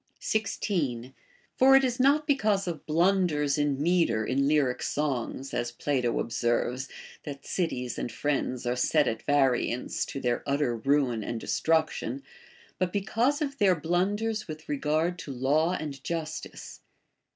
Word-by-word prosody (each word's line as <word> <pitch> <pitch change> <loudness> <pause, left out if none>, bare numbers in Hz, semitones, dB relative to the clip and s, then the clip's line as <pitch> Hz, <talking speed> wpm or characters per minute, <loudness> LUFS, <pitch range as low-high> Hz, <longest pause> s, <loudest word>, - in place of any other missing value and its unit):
16. 145 - -2 0.4
For 270 +1 +7
it 270 - +6
is 250 -1 0
not 285 +4 +4
because 215 -10 +1
of 165 -4 -5
blunders 160 -4 +2
in 145 -2 +1
metre 155 -9 +2
in 140 +4 +1
lyric 145 -4 +2
songs, 135 -2 -2
as 120 0 -1
Plato 125 -1 -1
observes, 120 +3 -1 0.3
that 140 -2 -8
cities 125 -9 -2
and 120 - -3
friends 130 -1 -2
are 120 0 0
set 145 +3 +2
at 110 - -2
variance 130 -3 +1
to - - -5
their 120 -2 0
utter 140 -3 +1
ruin 125 -2 +1
and 115 +2 -4
destruction, 160 - 0 0.6
but 185 -1 0
be 205 - 0
cause 255 +9 +1
of 280 -1 -5
their 190 -3 +5
blunders 205 +7 -1
with 155 0 -8
regard 155 +5 0
to 150 -4 -7
laAV 150 +7 +1
and 140 -3 -6
justice. 160 -2 -5
150 Hz, 145 wpm, -28 LUFS, 130-185 Hz, 0.6 s, For